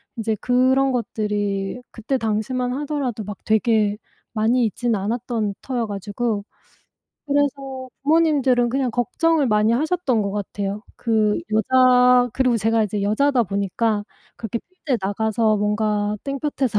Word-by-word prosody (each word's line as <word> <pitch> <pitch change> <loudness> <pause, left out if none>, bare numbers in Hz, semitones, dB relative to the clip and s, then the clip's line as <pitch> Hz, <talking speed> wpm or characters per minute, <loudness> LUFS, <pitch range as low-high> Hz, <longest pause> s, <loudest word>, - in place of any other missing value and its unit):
인제 225 -2 -1
그런 260 +2 +3
것들이 210 -3 -2
그때 240 +4 -2
당시만 245 +3 -1
하더라도 275 -6 -3
막 205 -1 -7
되게 220 -2 +2 0.4
많이 230 +3 +2
있지는 230 +2 -1
않았던 220 0 -2
터여 245 -3 -2
가지고 205 +1 -3 0.8
그래서 275 -2 -1
부모님들은 280 -5 +3
그냥 260 0 0
걱정을 275 +6 +1
많이 215 0 +3
하셨던 285 -4 +1
것 200 - -2
같아요. 205 0 -4
그 215 -3 +1
여자 250 +2 +5
그리고 255 -1 +2
제가 225 +1 +2
이제 205 0 -3
여자다 245 +6 +2
보니까 205 +2 -1 0.3
그렇게 230 +1 -4
필드에 320 -7 -4
나가서 215 +2 +1
뭔가 210 0 0
땡볕에서 275 -4 -1
230 Hz, 305 characters per minute, -22 LUFS, 210-260 Hz, 0.8 s, 여자